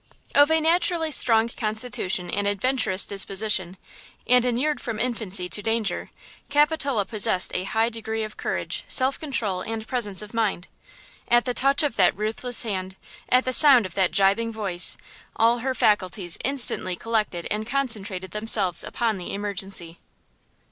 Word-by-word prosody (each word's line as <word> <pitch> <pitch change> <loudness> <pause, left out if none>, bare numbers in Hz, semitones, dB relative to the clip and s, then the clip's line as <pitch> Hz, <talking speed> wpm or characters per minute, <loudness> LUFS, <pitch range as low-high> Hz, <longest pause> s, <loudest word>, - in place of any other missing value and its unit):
OF 290 +1 +5
a 320 0 +2
naturally 325 0 +1
strong 225 -4 +4
constitution 215 -5 -1
and 205 0 -1
adventurous 205 -1 +1
disposition, 195 -2 +1 0.5
and 250 0 +3
inured 255 +5 -1
from 230 -3 -5
infancy 215 -7 -1
to 205 - -2
danger, 225 -3 -2 0.4
Capitola 290 -6 +1
possessed 205 -4 +2
a 185 - -2
high 225 +3 0
degree 220 -1 -5
of 215 0 -8
courage, - - -4
self 260 +1 +2
control 220 -11 -2
and 225 +1 -6
presence 215 -5 -1
of 210 - -12
mind. 210 -6 -2 0.6
At 240 0 +3
the 250 - -2
touch 275 +4 +3
of 285 -6 -2
that 185 -1 +3
ruthless 225 +4 0
hand, 190 -4 -5 0.3
at 255 +1 +3
the 255 - -1
sound 260 -4 +6
of 185 - -8
that 190 -2 +1
gibing 200 +4 +1
voice, 195 -5 +1 0.4
all 230 +2 +2
her 260 +2 -3
faculties 185 -5 +1
instantly 245 -8 +3
collected 210 -5 -2
and 215 +1 -3
concentrated 215 -8 -2
themselves 210 -4 0
upon 225 -4 -2
the 175 - -6
emergency. 195 -4 -4
220 Hz, 150 wpm, -23 LUFS, 195-250 Hz, 0.6 s, sound